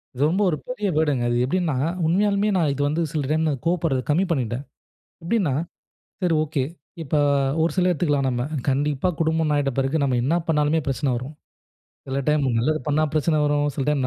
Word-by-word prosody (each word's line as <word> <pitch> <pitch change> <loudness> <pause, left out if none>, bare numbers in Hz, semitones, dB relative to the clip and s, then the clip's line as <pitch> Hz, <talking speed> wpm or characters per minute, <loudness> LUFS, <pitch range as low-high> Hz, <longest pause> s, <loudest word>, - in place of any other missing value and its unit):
இது 130 - -5
ரொம்ப 185 +5 0
ஒரு 155 - -1
பெரிய 250 -5 -2
வேர்டுங்க 145 -6 +1
அது 120 - +1
எப்படின்னா, 170 0 0 0.3
உண்மயாலுமே 200 +4 +2
நான் 155 -5 +2
இது 145 - -3
வந்து 155 +4 0
சில 155 -3 -1
டைம் 160 +1 +1 0.2
கோவப்படுறது 165 -6 +1
கம்மி 170 +6 +3
பண்ணிட்டேன். 125 -2 -1 0.6
எப்படின்னா, 175 - +1 0.7
சரி, 175 -2 +2
ஓகே. 145 -3 -1 0.4
இப்ப 150 -1 -4 0.5
ஒரு 165 - +2
சில 180 -1 +3
எடுத்துக்கலாம் 145 -5 +1
நம்ம 120 -1 -1 0.3
கண்டிப்பா 140 +3 +1
குடும்பம் 160 -1 +1
ஆயிட்ட 140 -1 +1
பிறகு 135 +3 +1
நம்ம 130 -3 +1
என்ன 155 +6 +2
பண்ணாலுமே 150 0 +2
பிரச்சனை 135 +1 0
வரும். 130 +5 -6 0.7
சில 135 +1 -2
டைம் 150 -1 +2
நல்லது 155 +7 +1
பண்ணா 150 +1 +2
பிரச்சனை 155 +1 +2
வரும். 145 0 +1
சில 140 - -2
டைம் 140 -4 +1
150 Hz, 175 wpm, -23 LUFS, 140-165 Hz, 0.7 s, கம்மி